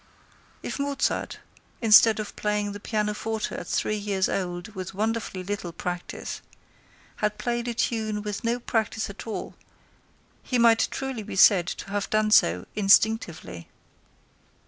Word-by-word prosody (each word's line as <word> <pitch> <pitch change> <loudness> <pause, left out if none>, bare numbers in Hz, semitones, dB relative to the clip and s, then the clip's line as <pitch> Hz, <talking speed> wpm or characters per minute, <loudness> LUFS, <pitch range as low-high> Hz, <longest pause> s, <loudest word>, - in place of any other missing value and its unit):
If - - -4
Mozart, 280 0 -1 0.4
instead 220 0 +6
of 210 - -5
playing 210 -1 -1
the 205 - -7
pianoforte 215 +1 -2
at - - -6
three 215 - 0
years 200 -2 0
old 175 +1 -3
with 190 -2 -7
wonderfully 215 -3 -2
little 195 -2 -4
practice, 175 +1 -5 0.8
had 210 0 -1
played 240 0 -2
a 235 - -2
tune 215 -3 -1
with 210 -1 -4
no 235 +1 0
practice 220 -3 -1
at 205 - -10
all, 220 - -5 1.0
be 250 - +2
might 230 -1 +5
truly 265 -4 -4
be 210 - -7
said 190 -2 +6
to 195 - -6
have 205 -1 -2
done 215 0 +1
so 90 - +4
instinctively. 200 - +2
210 Hz, 140 wpm, -26 LUFS, 195-225 Hz, 1.0 s, instead